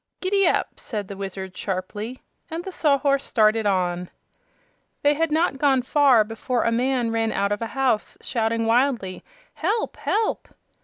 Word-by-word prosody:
"Gid 370 +1 -2
dap!" 395 -3 +2
said 210 -4 -5
the 200 - -7
Wizard 190 -1 -6
sharply, 205 +6 -4 0.3
and 330 +2 -4
the 380 - -6
Sawhorse 280 -4 +2
started 215 -1 +2
on. 180 -2 0 0.9
They 290 0 +5
had 325 +1 0
not 310 -3 +1
gone 270 -3 +3
far 265 -4 +5
before 225 +3 -2
a 230 - +1
man 245 0 +1
ran 225 -1 0
out 200 +1 0
of 205 - -1
a 230 - -2
house 255 -5 0
shouting 225 -1 -1
wildly, 230 -5 +1 0.3
"Help! 415 +7 -1
Help!" 440 +1 -1
235 Hz, 155 wpm, -23 LUFS, 210-285 Hz, 0.9 s, They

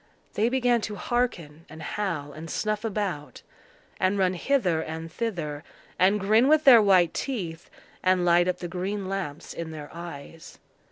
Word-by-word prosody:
They 220 +3 +2
began 245 -2 +2
to 210 -1 -4
hearken 180 -9 -2
and 160 +1 -10
howl 160 -9 -3
and 160 +2 -9
snuff 215 0 -2
about, 190 - -4 0.6
and 190 +2 +2
run 185 -1 +2
hither 180 - +1
and 160 +1 -6
thither, 160 -11 -4 0.4
and 195 +4 +4
grin 215 +6 +4
with 310 +1 +4
their 245 -5 +9
white 185 -5 +4
teeth, 175 -11 -4 0.3
and 185 -1 +2
light 175 0 +4
up 180 0 0
the 175 - -5
green 190 +3 -3
lamps 185 -6 -5
in 170 -1 -5
their 150 -2 -8
eyes. 165 -1 -10
185 Hz, 160 wpm, -26 LUFS, 165-210 Hz, 0.6 s, their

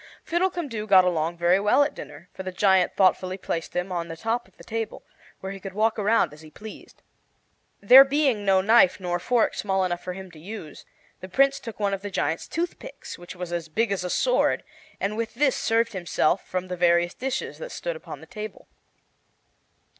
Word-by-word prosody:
Fiddlecumdoo 340 - -2
got 190 -2 +7
along 170 -1 0
very 175 +2 +3
well 210 +8 +4
at 290 - -2
dinner, 170 - -10
for - - -7
the 185 0 -5
giant 190 -1 +3
thoughtfully 185 -1 +2
placed 165 -3 -4
him 180 +2 -2
on 170 -2 -2
the 165 - -7
top 225 +6 -2
of - - -28
the - - -14
table, 225 -1 -5 0.4
where 190 - -5
he 195 - -7
could 190 0 -8
walk 220 +1 +1
around 210 -6 +2
as 150 - -14
he 155 - -13
pleased. 215 +7 -12 0.8
There 255 +7 +10
being 270 -6 +1
no 190 -1 +4
knife 205 -2 +5
nor 175 -1 -2
fork 235 +5 +1
small 190 -2 0
enough 175 -1 -3
for 180 - -4
him 190 0 -9
to 160 - -14
use, 180 -2 -9 0.3
the 185 - -9
Prince 275 +6 +3
took 230 -3 -9
one 200 -1 0
of 195 - -3
the 205 - -5
giant's 165 -3 -2
toothpicks, 350 +9 -6
which 175 +1 -10
was 180 -1 -6
as 165 -2 -3
big 225 +7 0
as 195 -2 -1
a 180 - -3
sword, - - +1 0.4
and 200 +2 -2
with 230 +1 -4
this 270 0 +2
served 230 0 +1
himself 175 -1 0
from 185 0 -3
the 180 - -4
various 175 0 +3
dishes 265 0 -4
that - - -7
stood - - -5
on - - -8
the - - -11
table. 215 -2 -8
195 Hz, 205 wpm, -25 LUFS, 180-230 Hz, 0.8 s, There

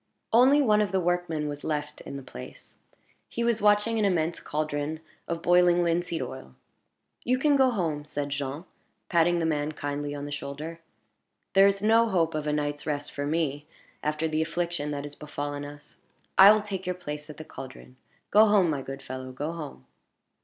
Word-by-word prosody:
Only 265 +5 +6
one 210 -4 +4
of 205 -3 0
the 190 - +2
workmen 175 -3 -1
was 145 0 -6
left 150 -1 -3
in 140 - -7
the 135 - -8
place. 65 - -11 0.5
He 235 - -2
was 235 -2 +1
watching 210 +2 +3
an - - +2
immense 170 -3 +1
caldron 150 0 -3 0.3
of 170 0 -3
boiling 175 0 +5
linseed 170 0 0
oil. 65 - -9 0.7
"You 255 +1 +2
can 290 +2 +3
go 265 -2 +5
home," 165 -10 -1
said 145 -1 -4
Jean, 140 +3 -4 0.4
patting 175 0 +3
the 165 - 0
man 150 -1 0
kindly 145 0 -4
on 145 0 -5
the 145 - -7
shoulder. 150 +4 -6 0.7
"There 195 0 +7
is 200 0 0
no 225 +1 +4
hope 165 -4 +1
of 155 -1 -3
a - - +1
night's 145 0 -2
rest 145 -1 -2
for 145 0 -3
me, 150 -2 -1 0.3
after 155 +2 -1
the 155 0 0
affliction 170 -2 -2
that 145 -1 -3
has 145 0 -8
befallen 145 -1 -5
us; 145 0 -11 0.4
I 195 +2 +10
will 215 -1 +3
take 190 -3 -5
your 180 - -1
place 150 -3 -7
at 150 - -9
the 155 - -8
caldron. 130 -2 -10 0.4
Go 215 +2 +7
home, 195 -5 +4
my 140 -2 -2
good 135 +1 -7
fellow 130 0 -6
go 145 +5 -4
home." 150 - -8
155 Hz, 190 wpm, -27 LUFS, 145-180 Hz, 0.7 s, I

